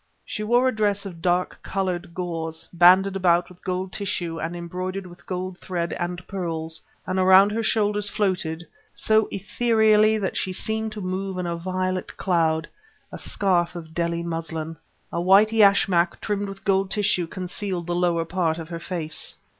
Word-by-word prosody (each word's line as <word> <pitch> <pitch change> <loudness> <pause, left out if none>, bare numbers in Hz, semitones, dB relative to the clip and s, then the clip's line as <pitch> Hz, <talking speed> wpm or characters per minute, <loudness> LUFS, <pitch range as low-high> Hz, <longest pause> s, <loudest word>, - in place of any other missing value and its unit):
She 210 - -5
wore 240 +4 +3
a 255 - 0
dress 205 -2 +1
of 175 -4 -8
dark 180 0 +1
lilac - - -18
colored 185 -2 -3
gauze, 165 -2 -4
banded 185 +3 +6
about 175 -2 +3
with 180 -1 -17
gold 185 0 -2
tissue 175 -5 -3
and 165 +2 -3
embroidered 185 +3 -4
with 175 -1 -14
gold 185 0 -4
thread 170 -2 -3
and 180 0 -4
pearls; 165 -4 -4 0.2
and 185 0 -1
around 190 +2 +7
her 225 +2 -1
shoulders 210 -2 +1
floated, 180 -6 -1 0.3
so 220 0 +3
ethereally 220 +1 +3
that 200 -3 -2
she 185 - -1
seemed 220 +3 -2
to 210 - -6
move 185 +1 -3
in 180 - -2
a 170 0 -2
violet 185 +1 -3
cloud; 165 -4 +1 0.4
a - - -7
scarf 180 -3 0
of 160 -2 -8
Delhi 170 0 -1
muslin. 165 -1 -4 0.4
A 170 - -1
white 195 +4 +6
yashmak 195 -5 +4
trimmed 205 -1 -2
with 195 0 -9
gold 195 -1 +2
tissue 200 -5 +1
concealed 180 0 -4
the 175 - -2
lower 175 -2 +1
part 165 -2 0
of 165 -1 -7
her 170 -1 -5
face. 165 -2 -4
185 Hz, 170 wpm, -24 LUFS, 170-195 Hz, 0.4 s, around